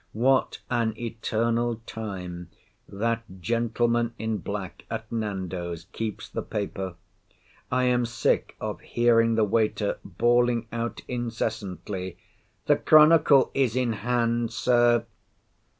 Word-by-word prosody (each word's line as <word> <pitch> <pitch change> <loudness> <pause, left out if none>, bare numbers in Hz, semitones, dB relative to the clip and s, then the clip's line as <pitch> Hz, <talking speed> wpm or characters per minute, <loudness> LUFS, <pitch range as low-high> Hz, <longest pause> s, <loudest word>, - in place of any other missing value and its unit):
What 130 +4 +2
an 115 -3 0
eternal 115 0 -1
time 90 -5 -6 0.4
that 115 +3 -1 0.2
gentleman 115 +2 0
in 110 -1 -2
black, 100 +1 -6
at 110 - -5
Nando's, 95 -6 -3
keeps 110 -3 -4
the - - -4
paper! 95 -3 -4 0.8
I 125 0 +2
am 125 -1 +2
sick 115 -2 0
of - - -4
hearing 115 -1 +3
the 110 - +3
waiter 105 0 0
bawling 120 0 +2
out 115 0 -3
incessantly, 105 -6 -4 0.5
"the - - +4
Chronicle 155 -3 +6
is 130 -4 +1
in 125 -3 +1
hand, 115 +1 0
Sir." 120 0 +3
115 Hz, 110 wpm, -26 LUFS, 105-120 Hz, 0.8 s, Chronicle